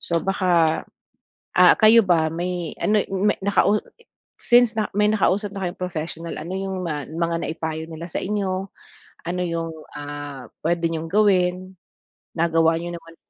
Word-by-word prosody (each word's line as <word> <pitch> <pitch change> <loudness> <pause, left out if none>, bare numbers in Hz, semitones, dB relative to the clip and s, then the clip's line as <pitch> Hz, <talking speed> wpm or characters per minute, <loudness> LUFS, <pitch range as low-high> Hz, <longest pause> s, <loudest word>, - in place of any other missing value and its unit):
So 170 -1 -1
baka, 175 -4 +2 0.7
ah, - - +8
kayo 225 +1 +7
ba 160 -3 +3
may 175 -1 -3
ano 210 -1 +3
may 195 +2 +1
nakau 200 +1 +3 0.6
since 240 -1 +5
na 215 - 0
may 210 0 +4
nakausap 205 -1 +1
na 195 -2 -4
kayong 175 - -11
professional 165 -1 -4
ano 175 +4 -6
yung 190 -1 -3
ma 150 -4 -3
mga 165 +1 -2
naipayo 160 -1 -4
nila 165 +2 -7
sa - - -3
inyo 195 -1 -2 0.6
ano 180 +1 -2
yung, 165 -1 -2 0.3
ah, 145 -3 -7 0.2
puwede 170 0 +1
niyong 165 0 -4
gawin, 185 -2 +2 0.6
nagawa 165 0 +3
niyo 175 +1 -5
naman 165 -1 -11
175 Hz, 150 wpm, -23 LUFS, 165-195 Hz, 0.7 s, ah